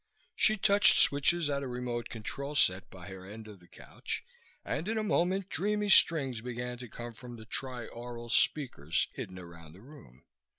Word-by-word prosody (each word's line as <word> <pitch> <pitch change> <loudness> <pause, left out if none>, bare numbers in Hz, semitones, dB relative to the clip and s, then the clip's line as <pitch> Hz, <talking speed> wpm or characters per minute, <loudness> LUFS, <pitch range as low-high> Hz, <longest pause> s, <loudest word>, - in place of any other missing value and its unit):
She 215 - +3
touched 200 0 +5
switches 145 +3 +4
at 140 -1 -1
a 135 - -4
remote 125 -1 -4
control 140 +6 -6
set 95 -7 +2
by 90 -2 -12
her 95 -1 -10
end 110 +3 -10
of 105 -3 -12
the 90 - -20
couch, - - -7 0.4
and 170 - -3
in 225 +1 -1
a 215 - 0
moment 190 -1 0
dreamy 210 +1 -1
strings 135 - +5
began 125 0 -5
to 125 -2 -9
come 120 +2 -8
from 120 +1 -11
tri 125 -3 -4
aural 120 0 -9
speakers 115 - +2
hidden 95 - -7
around 85 -3 -12
the 95 - -16
room. 125 - -16
125 Hz, 175 wpm, -30 LUFS, 110-150 Hz, 0.4 s, touched